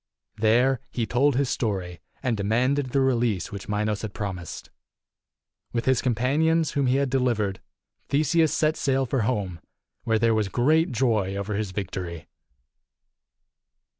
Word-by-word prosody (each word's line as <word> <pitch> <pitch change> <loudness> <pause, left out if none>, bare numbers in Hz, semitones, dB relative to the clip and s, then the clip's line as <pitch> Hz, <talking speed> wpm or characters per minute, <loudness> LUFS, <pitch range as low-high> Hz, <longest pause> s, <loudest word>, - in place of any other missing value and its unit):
There 120 +4 +3
he 115 - -2
told 125 +5 +2
his 140 +1 +1
story, 95 -9 -2 0.2
and 125 -4 +1
demanded 125 +7 +1
the 135 +2 +1
release 120 -7 +1
which 100 0 -7
Minos 105 0 -1
had 110 -2 -6
promised. 95 -5 -6 1.0
With 115 -1 -1
his 130 -2 +3
companions 150 +6 +1
whom 140 -2 0
he 125 - +3
had 140 -1 +1
delivered, 115 -7 0 0.5
Theseus 155 +2 +3
set 155 0 +1
sail 135 -1 +1
for 130 0 0
home, 100 -7 -1 0.4
where 110 -1 +2
there 115 0 +3
was 110 -2 0
great 155 - +2
joy 110 -6 +1
over 100 +1 -3
his 105 0 -2
victory. 90 -3 -5
115 Hz, 140 wpm, -25 LUFS, 105-135 Hz, 1.0 s, There